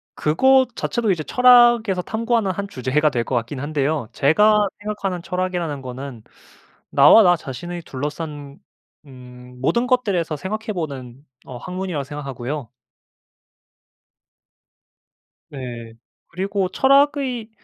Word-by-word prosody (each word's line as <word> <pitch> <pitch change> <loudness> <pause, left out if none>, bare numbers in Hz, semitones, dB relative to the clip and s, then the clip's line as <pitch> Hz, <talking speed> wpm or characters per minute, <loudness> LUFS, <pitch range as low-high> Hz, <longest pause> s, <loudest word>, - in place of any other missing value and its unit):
그것 260 +12 +3
자체도 230 -4 -1
이제 165 -4 -1
철학에서 240 -4 +5
탐구하는 225 0 -1
한 200 +2 -4
주제가 150 -1 0
될 120 -3 -1
거 130 - -3
같긴 120 +3 -3
한데요. 145 -3 -2
제가 210 +8 +3
생각하는 205 -4 -4
철학이라는 180 -6 -3
거는 130 -2 -8 0.7
나와 145 +11 +7
나 175 -1 +5
자신의 170 +4 -7
둘러싼 145 0 -6 0.5
음 125 -1 -14
모든 235 - +1
것들에서 200 -11 0
생각해 215 - -4
보는 140 - -6 0.2
어 125 - -8
학문이라고 180 +1 -4
생각하고요. 140 -2 -6 2.8
네. 120 -4 -8 0.4
그리고 195 +1 -2
철학의 270 -1 +2
165 Hz, 265 characters per minute, -21 LUFS, 135-210 Hz, 2.8 s, 나와